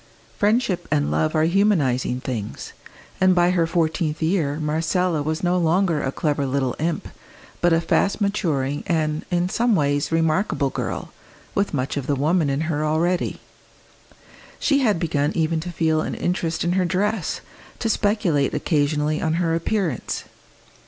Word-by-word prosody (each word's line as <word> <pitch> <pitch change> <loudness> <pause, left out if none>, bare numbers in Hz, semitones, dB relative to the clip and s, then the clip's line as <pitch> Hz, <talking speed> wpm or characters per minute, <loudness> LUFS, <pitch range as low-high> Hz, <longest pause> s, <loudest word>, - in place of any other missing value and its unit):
Friendship 210 -3 +1
and 75 0 +1
love 80 +1 0
are 155 - +3
humanising 160 -10 +2
things, 115 -6 -5 0.5
and 185 -1 +5
by 175 0 +4
her 170 -3 +2
fourteenth 160 -2 0
year 160 -3 0
Marcella 160 +2 0
was 155 +3 -2
no 180 0 +2
longer 170 -1 +2
a 135 - -1
clever 145 -1 -1
little 130 -2 -1
imp, 165 +1 -1 0.5
but 175 - +3
a 165 - +4
fast 195 +5 +1
maturing 150 -9 -1
and 155 -3 0
in 175 0 +1
some 235 +3 +2
ways 145 -3 +1
remarkable 165 -3 +1
girl, - - -4 0.4
with 200 0 0
much 135 0 -2
of 140 -1 -3
the 145 - +1
woman 155 +3 +1
in 140 +2 0
her 155 -2 -1
already. 165 +4 0 1.2
She 280 -2 +2
had 220 -8 +2
begun 150 -3 0
even 160 0 +1
to 175 +2 -5
feel 160 -1 +1
an - - -3
interest 170 -2 -1
in 175 - +1
her 185 0 +2
dress, 195 +2 -1 0.4
to 230 - -2
speculate 205 -10 +1
occasionally 150 0 0
on 160 - 0
her 165 -1 +1
appearance. 165 - -1
160 Hz, 155 wpm, -22 LUFS, 145-180 Hz, 1.2 s, and